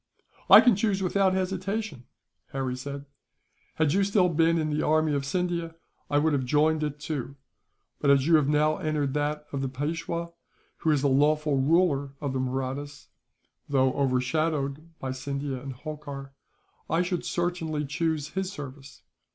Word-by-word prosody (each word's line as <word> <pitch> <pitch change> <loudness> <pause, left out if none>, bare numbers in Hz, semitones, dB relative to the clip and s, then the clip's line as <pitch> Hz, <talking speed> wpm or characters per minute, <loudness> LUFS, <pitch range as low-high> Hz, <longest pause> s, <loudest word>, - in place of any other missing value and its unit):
"I - - +11
can 245 -4 +5
choose 200 -1 0
without 190 0 +2
hesitation," 190 - -3 0.5
Harry 130 -2 -2
said. 140 +2 -6 0.7
"Had 155 -2 +2
you 200 +1 +3
still 195 -2 +3
been 165 0 +3
in 155 -1 -1
the 150 - 0
army 155 0 +2
of 140 -1 0
Scindia, 170 0 -2 0.3
I 145 - +2
would 155 +1 +2
have 135 -2 +1
joined 150 +4 +2
it, 150 -1 -3
too; 145 -3 -4 0.6
but 140 - +1
as 140 -1 +5
you 165 - +3
have 145 -3 +1
now 150 +1 +3
entered 150 -3 -1
that 150 +1 -1
of 140 - -2
the 135 - -1
Peishwa, 165 +5 -3 0.5
who 160 - -1
is 150 -3 +2
the - - +4
lawful 150 +1 +2
ruler 140 -2 +2
of 140 -3 -3
the 130 - -1
Mahrattas, 135 +3 -4 0.6
though 130 -2 +3
overshadowed 140 +3 0
by 130 - -4
Scindia 140 0 -4
and 135 0 -6
Holkar, 140 -1 -8 0.6
I 165 +2 +2
should 180 -1 -2
certainly 165 -4 -2
choose 155 +1 -1
his 190 0 -3
service. 135 -3 -10
150 Hz, 160 wpm, -27 LUFS, 140-165 Hz, 0.7 s, I